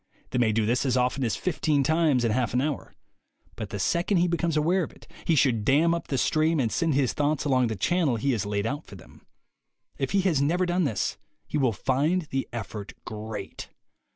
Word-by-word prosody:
They 125 Hz, -, 0 dB
may 115 Hz, -2 st, +3 dB
do 110 Hz, 0 st, +1 dB
this 120 Hz, +3 st, +1 dB
as 130 Hz, -2 st, +1 dB
often 125 Hz, +2 st, +1 dB
as 115 Hz, -, 0 dB
fifteen 155 Hz, -5 st, 0 dB
times 155 Hz, -4 st, +2 dB
in 115 Hz, -, +1 dB
half 125 Hz, 0 st, 0 dB
an 125 Hz, -, +3 dB
hour. 145 Hz, 0 st, -3 dB, 0.6 s
But -, -, -6 dB
the -, -, -4 dB
second 170 Hz, -, +1 dB
he 175 Hz, +1 st, +3 dB
becomes 170 Hz, -2 st, 0 dB
aware 170 Hz, +5 st, +2 dB
of 165 Hz, -, -4 dB
it, -, -, -18 dB, 0.2 s
he 165 Hz, -, +3 dB
should 125 Hz, -7 st, +2 dB
dam 155 Hz, +8 st, +4 dB
up 170 Hz, 0 st, -3 dB
the 135 Hz, -, -1 dB
stream 155 Hz, +3 st, +2 dB
and 115 Hz, -4 st, +1 dB
send 165 Hz, -4 st, +1 dB
his 135 Hz, -3 st, +2 dB
thoughts 150 Hz, 0 st, 0 dB
along 130 Hz, -3 st, +3 dB
the 110 Hz, -, -3 dB
channel 150 Hz, -, +1 dB
he 135 Hz, +5 st, 0 dB
has 110 Hz, -6 st, 0 dB
laid 100 Hz, 0 st, -2 dB
out 145 Hz, +6 st, -3 dB
for -, -, -11 dB
them. 90 Hz, -, -16 dB, 0.7 s
If 135 Hz, -, -1 dB
he 200 Hz, -, +2 dB
has 170 Hz, -7 st, +2 dB
never 175 Hz, +6 st, +2 dB
done 175 Hz, 0 st, +1 dB
this, 115 Hz, -8 st, -2 dB, 0.3 s
he 150 Hz, -, -2 dB
will 130 Hz, -4 st, +3 dB
find 145 Hz, -, 0 dB
the 135 Hz, 0 st, -1 dB
effort 105 Hz, -3 st, -6 dB
great. 105 Hz, -2 st, -7 dB
135 Hz, 220 wpm, -26 LUFS, 115-165 Hz, 0.7 s, dam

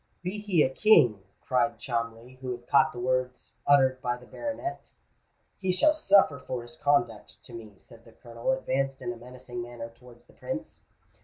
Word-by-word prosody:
"Be 185 Hz, +4 st, -3 dB
he 195 Hz, -7 st, +3 dB
a -, -, +2 dB
king," 125 Hz, -, +5 dB, 0.2 s
cried 135 Hz, +2 st, +1 dB
Cholmondeley, 115 Hz, +1 st, -4 dB
who 130 Hz, -, -5 dB
had 120 Hz, 0 st, -10 dB
caught 155 Hz, +4 st, +4 dB
the -, -, -11 dB
words 125 Hz, 0 st, -2 dB
uttered 130 Hz, -2 st, +4 dB
by 120 Hz, -1 st, -1 dB
the 125 Hz, -, -15 dB
baronet, 295 Hz, -, -5 dB, 0.7 s
"he 190 Hz, -1 st, 0 dB
shall 190 Hz, +12 st, +4 dB
suffer 195 Hz, -, +4 dB
for 125 Hz, -2 st, -5 dB
his 120 Hz, +6 st, -12 dB
conduct 130 Hz, -8 st, 0 dB
to 120 Hz, -, -14 dB
me;"—and 115 Hz, +1 st, -12 dB
the 115 Hz, -, -17 dB
Colonel 115 Hz, -, -4 dB
advanced 135 Hz, -, -1 dB
in 120 Hz, -1 st, -2 dB
a -, -, -12 dB
menacing 125 Hz, 0 st, -8 dB
manner 120 Hz, -1 st, -7 dB
towards 120 Hz, 0 st, -18 dB
the -, -, -22 dB
Prince. -, -, -6 dB
125 Hz, 175 wpm, -28 LUFS, 120-145 Hz, 0.7 s, king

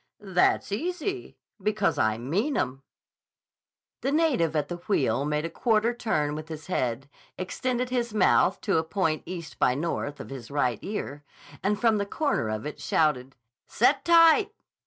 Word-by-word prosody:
"That's 190 Hz, -1 st, +1 dB
easy. 360 Hz, -, -3 dB, 0.2 s
Because 210 Hz, -1 st, 0 dB
I 110 Hz, 0 st, +2 dB
mean 190 Hz, -, -1 dB
'em." 130 Hz, +1 st, -2 dB, 1.2 s
The 275 Hz, -, 0 dB
native 275 Hz, -, +2 dB
at 150 Hz, -2 st, 0 dB
the 175 Hz, -, -5 dB
wheel 140 Hz, -, 0 dB
made 150 Hz, +1 st, -1 dB
a -, -, -3 dB
quarter 225 Hz, 0 st, +1 dB
turn 155 Hz, -12 st, -1 dB
with 155 Hz, +1 st, -6 dB
his 155 Hz, -1 st, -7 dB
head, 130 Hz, -6 st, -2 dB, 0.3 s
extended 250 Hz, +7 st, -2 dB
his 240 Hz, -2 st, -1 dB
mouth 205 Hz, -2 st, +3 dB
to 200 Hz, -6 st, +1 dB
a -, -, -1 dB
point 160 Hz, -3 st, -1 dB
east 170 Hz, -3 st, -7 dB
by 125 Hz, -, +3 dB
north 145 Hz, -1 st, -3 dB
of -, -, -9 dB
his 130 Hz, -4 st, -8 dB
right 125 Hz, -6 st, 0 dB
ear, 145 Hz, -8 st, -5 dB, 0.4 s
and 205 Hz, +1 st, 0 dB
from 225 Hz, -3 st, +3 dB
the 200 Hz, -, -2 dB
corner 280 Hz, -, -1 dB
of 110 Hz, +2 st, -3 dB
it 150 Hz, -, -6 dB
shouted: 135 Hz, -4 st, +1 dB, 0.3 s
"Set -, -, +2 dB
tight. 340 Hz, +6 st, +5 dB
175 Hz, 160 wpm, -27 LUFS, 145-235 Hz, 1.2 s, tight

